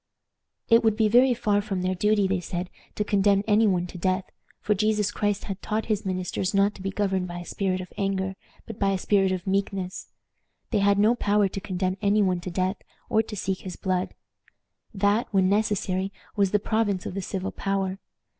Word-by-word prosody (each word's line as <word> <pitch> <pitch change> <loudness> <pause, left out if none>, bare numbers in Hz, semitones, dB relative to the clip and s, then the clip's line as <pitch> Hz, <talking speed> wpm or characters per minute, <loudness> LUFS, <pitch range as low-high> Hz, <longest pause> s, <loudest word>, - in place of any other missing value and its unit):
It 230 0 +5
would 220 -2 +3
be 220 -1 +4
very 245 +3 +5
far 205 -3 +1
from 195 -3 -3
their 185 0 +1
duty, 205 +1 +2
they 190 -1 0
said, 180 +1 -5 0.2
to 210 - 0
condemn 200 -1 +3
any 215 +1 +4
one 180 -3 +1
to 180 0 -9
death, 185 +1 0 0.3
for 210 - +1
Jesus 210 0 +1
Christ 205 -1 -1
had 195 -1 -5
taught 220 +1 -2
his 215 -2 -1
ministers 185 +1 -2
not 200 +1 +3
to - - -12
be 195 - -2
governed 190 -2 -1
by 175 0 -6
a 175 - -7
spirit 185 -1 -1
of 180 - -10
anger, 190 -1 -1 0.3
but 225 - -9
by 195 -1 +2
a - - 0
spirit 195 0 +2
of 185 -1 -3
meekness. 195 -1 -2 0.6
They 215 - +2
had 200 0 +3
no 215 +3 +5
power 205 -3 +2
to 195 - -5
condemn 185 -1 -2
any 205 0 +3
one 185 -2 +1
to 175 - -6
death, 185 +2 -1 0.3
or 220 - +4
to 220 -1 -7
seek 190 -1 -2
his 185 -2 -7
blood. 185 -1 -2 0.8
That, 205 +2 +1
when 190 -2 +3
necessary, 195 -2 0 0.2
was 200 -2 +3
the 210 - +3
province 205 -2 0
of - - -4
the 195 - -3
civil 190 +1 -4
power. 195 -1 -2
195 Hz, 205 wpm, -26 LUFS, 185-210 Hz, 0.8 s, It